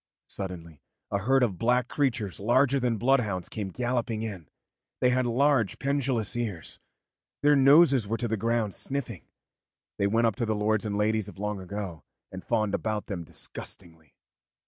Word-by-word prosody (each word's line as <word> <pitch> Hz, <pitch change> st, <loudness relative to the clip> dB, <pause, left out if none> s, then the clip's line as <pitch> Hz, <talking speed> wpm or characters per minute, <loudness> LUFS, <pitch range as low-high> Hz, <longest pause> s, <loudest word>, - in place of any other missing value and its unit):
Suddenly 85 Hz, -6 st, -6 dB, 0.3 s
a 100 Hz, -, +1 dB
herd 130 Hz, +6 st, +3 dB
of 100 Hz, -7 st, -1 dB
black 125 Hz, +1 st, +2 dB
creatures 115 Hz, -, -1 dB
larger 130 Hz, +6 st, +3 dB
than 120 Hz, -3 st, 0 dB
bloodhounds 110 Hz, -7 st, +1 dB
came 105 Hz, -3 st, -4 dB
galloping 120 Hz, 0 st, -2 dB
in; 95 Hz, -9 st, -6 dB, 0.5 s
they 125 Hz, -, +3 dB
had 125 Hz, 0 st, +1 dB
large 125 Hz, -3 st, +2 dB
pendulous 130 Hz, -5 st, -1 dB
ears, 105 Hz, -9 st, -4 dB, 0.6 s
their 145 Hz, 0 st, +6 dB
noses 140 Hz, -3 st, +6 dB
were 115 Hz, +2 st, -1 dB
to 120 Hz, -, -2 dB
the 110 Hz, -, 0 dB
ground 115 Hz, -1 st, 0 dB
sniffing, 125 Hz, -, -4 dB, 0.7 s
they 100 Hz, -, +3 dB
went 115 Hz, +3 st, +2 dB
up 115 Hz, -, +1 dB
to 120 Hz, -, 0 dB
the 110 Hz, -, +1 dB
lords 105 Hz, +1 st, +1 dB
and 100 Hz, -1 st, -2 dB
ladies 110 Hz, 0 st, +1 dB
of -, -, -13 dB
long 105 Hz, 0 st, -3 dB
ago 95 Hz, -3 st, -6 dB, 0.3 s
and 95 Hz, -1 st, -8 dB
fawned 110 Hz, -4 st, 0 dB
about 110 Hz, 0 st, -2 dB
them 90 Hz, -4 st, -5 dB
disgustingly. 80 Hz, -1 st, -9 dB
110 Hz, 165 wpm, -27 LUFS, 100-125 Hz, 0.7 s, their